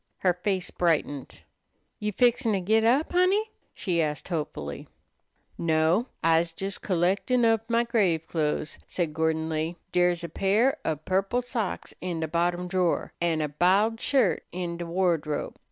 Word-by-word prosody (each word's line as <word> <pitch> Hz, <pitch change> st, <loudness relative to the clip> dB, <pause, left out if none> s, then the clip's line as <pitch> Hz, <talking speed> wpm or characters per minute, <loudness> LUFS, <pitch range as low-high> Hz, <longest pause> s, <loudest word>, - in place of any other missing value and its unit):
Her 180 Hz, -2 st, +3 dB
face 185 Hz, +1 st, -2 dB
brightened. 150 Hz, -5 st, -1 dB, 0.6 s
"You 210 Hz, 0 st, -1 dB
fixin' 240 Hz, +1 st, +2 dB
to 195 Hz, -, +1 dB
git 220 Hz, +5 st, +2 dB
up, 255 Hz, +7 st, +3 dB
Honey?" 385 Hz, +5 st, +2 dB, 0.2 s
she 175 Hz, -4 st, -1 dB
asked 150 Hz, 0 st, -3 dB
hopefully. 110 Hz, -, -4 dB, 0.7 s
"No, 165 Hz, +7 st, +2 dB, 0.2 s
I's 165 Hz, 0 st, +2 dB
jes 195 Hz, +1 st, -3 dB
collectin' 195 Hz, +7 st, +1 dB
ob 225 Hz, -1 st, +3 dB
my 235 Hz, 0 st, +2 dB
grave 200 Hz, -9 st, +1 dB
clothes," 150 Hz, -2 st, -2 dB
said 170 Hz, -4 st, -2 dB
Gordon 160 Hz, 0 st, 0 dB
Lee. 160 Hz, +2 st, -2 dB, 0.2 s
"Dere's 175 Hz, -1 st, +2 dB
a 170 Hz, -, -4 dB
pair 215 Hz, -, +2 dB
ob 155 Hz, -1 st, -3 dB
purple 195 Hz, +6 st, 0 dB
socks 235 Hz, -5 st, -3 dB
in 175 Hz, -2 st, -3 dB
de 160 Hz, -, -1 dB
bottom 175 Hz, +2 st, 0 dB
drawer, 180 Hz, -2 st, 0 dB
an' 165 Hz, -2 st, +1 dB
a 150 Hz, -, 0 dB
b'iled 195 Hz, +9 st, +2 dB
shirt 270 Hz, 0 st, +2 dB
in 175 Hz, -1 st, -4 dB
de 170 Hz, 0 st, -5 dB
wardrobe. 165 Hz, -4 st, -1 dB
180 Hz, 155 wpm, -27 LUFS, 160-215 Hz, 0.7 s, Her